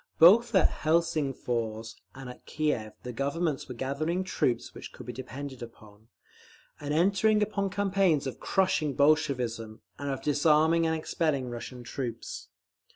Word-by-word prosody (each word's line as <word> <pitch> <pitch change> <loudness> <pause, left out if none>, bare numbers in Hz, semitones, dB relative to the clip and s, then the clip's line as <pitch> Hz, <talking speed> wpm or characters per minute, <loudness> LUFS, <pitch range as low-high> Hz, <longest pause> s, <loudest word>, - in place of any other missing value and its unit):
Both 220 +7 +7
at 190 - +6 0.2
Helsingfors 135 -9 0 0.2
and 135 -1 -9
at 125 - -11
Kiev 125 -9 -1
the 125 - -6
Governments 140 +4 -2
were 125 - -6
gathering 155 +9 -2
troops 125 -10 -1
which - - -9
could - - -11
be - - -6
depended 130 +1 -7
upon, 110 -2 -13 0.7
and 145 0 -5
entering 200 +6 +3
upon 200 -1 -1
campaigns 190 -6 +1
of 135 - -5
crushing 170 -7 +1
Bolshevism, 125 -7 +1 0.2
and 145 0 -3
of 135 - -4
disarming 155 +3 +3
and 160 - +1
expelling 155 -5 -1
Russian 120 +1 -7
troops. 120 -2 -6
145 Hz, 140 wpm, -28 LUFS, 125-165 Hz, 0.7 s, Both